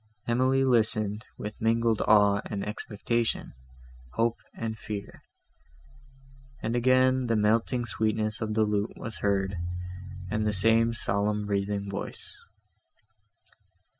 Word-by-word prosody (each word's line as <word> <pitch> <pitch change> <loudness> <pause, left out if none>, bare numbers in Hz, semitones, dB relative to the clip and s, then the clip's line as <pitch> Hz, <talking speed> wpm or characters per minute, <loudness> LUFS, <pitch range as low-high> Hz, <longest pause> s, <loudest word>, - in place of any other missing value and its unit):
Emily 130 +3 +3
listened, 110 -3 +2
with 105 0 -7
mingled 115 0 +2
awe 100 -2 +5
and 100 -2 -4
expectation, 115 +2 -2 0.6
hope 115 0 +1 0.2
and 115 -1 -3
fear; 105 -2 -7 1.4
and 115 +2 -1
again 130 +1 +3
the 115 - +2
melting 115 +3 +2
sweetness 110 -1 0
of 110 -1 -2
the 110 - +4
lute 105 +1 -1
was 115 -3 -7
heard, 95 -2 0 0.7
and 105 0 0
the 105 - +1
same 115 +4 +3
solemn 105 0 0
breathing 100 0 -1
voice. 100 0 -6
110 Hz, 110 wpm, -28 LUFS, 105-115 Hz, 1.4 s, awe